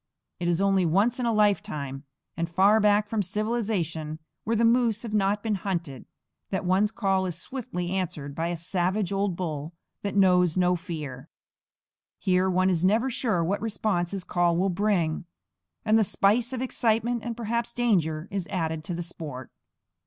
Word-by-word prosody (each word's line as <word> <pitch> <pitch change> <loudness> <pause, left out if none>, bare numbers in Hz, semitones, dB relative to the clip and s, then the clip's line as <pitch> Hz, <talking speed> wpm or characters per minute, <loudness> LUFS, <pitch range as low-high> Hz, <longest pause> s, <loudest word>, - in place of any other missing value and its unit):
It 175 - -2
is 175 +2 +1
only 195 -1 +3
once 200 +9 +2
in 245 - 0
a - - +2
lifetime, 195 -10 0 0.3
and 170 +1 -2
far 195 +5 +4
back 210 0 +3
from 220 0 0
civilization, 195 -7 -2 0.3
where 230 - +1
the 230 +1 +3
moose 230 -2 +3
have 225 -3 -6
not 205 0 +1
been 220 -2 0
hunted, 170 -8 -3 0.4
that 190 -1 -2
one's 190 +3 +3
call 195 -4 0
is 175 - -4
swiftly 180 -5 -5
answered 175 -7 -3
by 165 +3 -2
a 175 0 -2
savage 180 +3 -1
old 195 -2 0
bull 160 -3 -4 0.3
that 200 -1 -3
knows 180 -3 +4
no 180 0 +3
fear. 155 -7 -6 0.9
Here 185 0 +2
one 185 +1 +3
is 170 -1 0
never 225 +7 +3
sure 220 -8 0
what 195 +5 -1
response 210 -5 -1
his 195 -1 -4
call 175 -1 +1
will 190 +2 +2
bring; 180 -4 0 0.6
and 220 +1 +4
the - - +5
spice 215 +5 +2
of 255 -1 -2
excitement, 235 -1 0
and 235 -1 -4
perhaps 235 +1 -2
danger, 180 -10 +1
is 195 -3 -3
added 160 -4 -2
to 175 - -3
the 175 - -3
sport. 150 -7 -7
190 Hz, 175 wpm, -26 LUFS, 170-215 Hz, 0.9 s, the